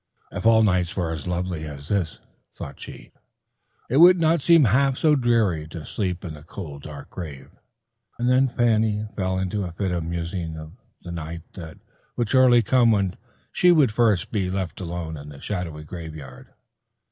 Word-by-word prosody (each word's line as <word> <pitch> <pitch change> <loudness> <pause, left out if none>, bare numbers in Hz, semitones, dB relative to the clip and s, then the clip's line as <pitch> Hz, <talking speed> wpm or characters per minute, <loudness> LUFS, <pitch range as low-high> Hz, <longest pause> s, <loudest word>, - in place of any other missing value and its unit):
"If - - -1
all 110 -1 +6
nights 95 -3 +1
were 85 -3 -1
as 80 -2 -5
lovely 90 -2 -2
as 70 -1 -9
this," 95 -5 -1 0.4
thought 70 - -8
she, - - -11 0.8
"it 130 - 0
would 180 +3 +8
not 165 -1 +3
seem 165 +1 +6
half 130 +4 +3
so 155 -2 +4
dreary 110 - +1
to 80 -1 -8
sleep 90 -3 -3
in 80 - -5
the 75 - -11
cold 75 -3 -8
dark 70 -1 -10
grave," 70 -6 -8 0.7
and 120 - -1
then 130 +2 +4
Fanny 110 -3 +1
fell 95 -1 -1
into 95 +2 -2
a 90 - -5
fit 95 +1 -2
of 85 -2 -1
musing 85 0 -4
of 80 0 -9 0.3
the 85 - -7
night 85 0 -6
that 80 -4 -9 0.4
would 120 -4 -1
surely 125 -2 +6
come 120 +1 +4
when 100 -4 +2 0.4
she 180 - +4
would 150 -9 +4
first 105 -5 +2
be 95 -4 -1
left 95 -3 -3
alone 85 -2 -5
in 75 +1 -10
the 70 -2 -11
shadowy 85 -6 -5
graveyard. 75 -5 -9
90 Hz, 180 wpm, -24 LUFS, 80-115 Hz, 0.8 s, would